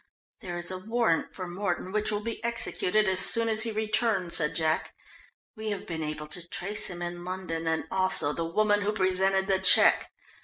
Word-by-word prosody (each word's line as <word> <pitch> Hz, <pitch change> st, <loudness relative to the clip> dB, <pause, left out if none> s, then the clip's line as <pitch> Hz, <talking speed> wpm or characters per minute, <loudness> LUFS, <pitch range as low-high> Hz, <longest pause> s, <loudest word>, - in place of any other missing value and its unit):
"There 175 Hz, -2 st, -6 dB
is 175 Hz, +1 st, -1 dB
a 185 Hz, -, -5 dB
warrant 220 Hz, -4 st, 0 dB
for 185 Hz, -2 st, -6 dB
Mordon 185 Hz, 0 st, -3 dB
which 215 Hz, +1 st, -1 dB
will 210 Hz, 0 st, -2 dB
be 230 Hz, 0 st, -6 dB
executed 215 Hz, -3 st, 0 dB
as 190 Hz, -1 st, +1 dB
soon 230 Hz, +4 st, +2 dB
as 220 Hz, -1 st, +2 dB
he 230 Hz, 0 st, +1 dB
returns," 215 Hz, -4 st, 0 dB
said 150 Hz, -2 st, -1 dB
Jack. 160 Hz, -1 st, -1 dB, 0.6 s
"We 220 Hz, -1 st, -5 dB
have 205 Hz, -2 st, -4 dB
been 160 Hz, -2 st, -5 dB
able 150 Hz, 0 st, -5 dB
to 170 Hz, +3 st, -8 dB
trace 210 Hz, +6 st, 0 dB
him 175 Hz, -2 st, -5 dB
in 175 Hz, 0 st, -6 dB
London 180 Hz, -3 st, -5 dB
and 160 Hz, 0 st, 0 dB
also 185 Hz, -6 st, +3 dB
the 165 Hz, -, -3 dB
woman 205 Hz, +5 st, +1 dB
who 205 Hz, +1 st, -1 dB
presented 190 Hz, -1 st, +1 dB
the 190 Hz, -1 st, +1 dB
cheque. 190 Hz, -, +6 dB
190 Hz, 195 wpm, -27 LUFS, 175-215 Hz, 0.6 s, cheque